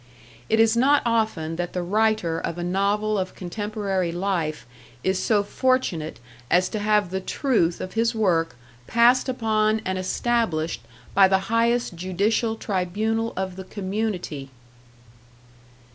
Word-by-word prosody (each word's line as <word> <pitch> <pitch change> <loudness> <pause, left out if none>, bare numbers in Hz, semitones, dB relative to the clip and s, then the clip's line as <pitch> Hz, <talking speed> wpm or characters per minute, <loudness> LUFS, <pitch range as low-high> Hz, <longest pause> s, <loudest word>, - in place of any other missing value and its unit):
It 220 - +3
is 225 0 +5
not 280 +4 +4
often 215 -9 0
that 175 0 -3
the 180 - -2
writer 205 -3 +1
of 165 - -4
a 175 - -3
novel 200 +3 +1
of 185 0 -4
contemporary 195 -1 -2
life 175 -4 -2 0.4
is 190 0 +1
so 210 -1 +2
fortunate 205 -9 0 0.3
as 180 +1 +3
to 215 - -3
have 210 -3 +2
the 190 0 -2
truth 190 - 0
of 185 - -6
his 230 +1 +1
work 170 - +1 0.3
passed 240 +3 +4
upon 220 -3 +1
and 185 0 -1
established 185 - -1 0.3
by 195 -1 +7
the 190 +3 0
highest 235 -1 +2
judicial 200 +6 0
tribunal 220 +3 -1
of 190 -1 -3
the 190 - -6
community! 190 -8 -4
200 Hz, 135 wpm, -24 LUFS, 180-225 Hz, 0.4 s, by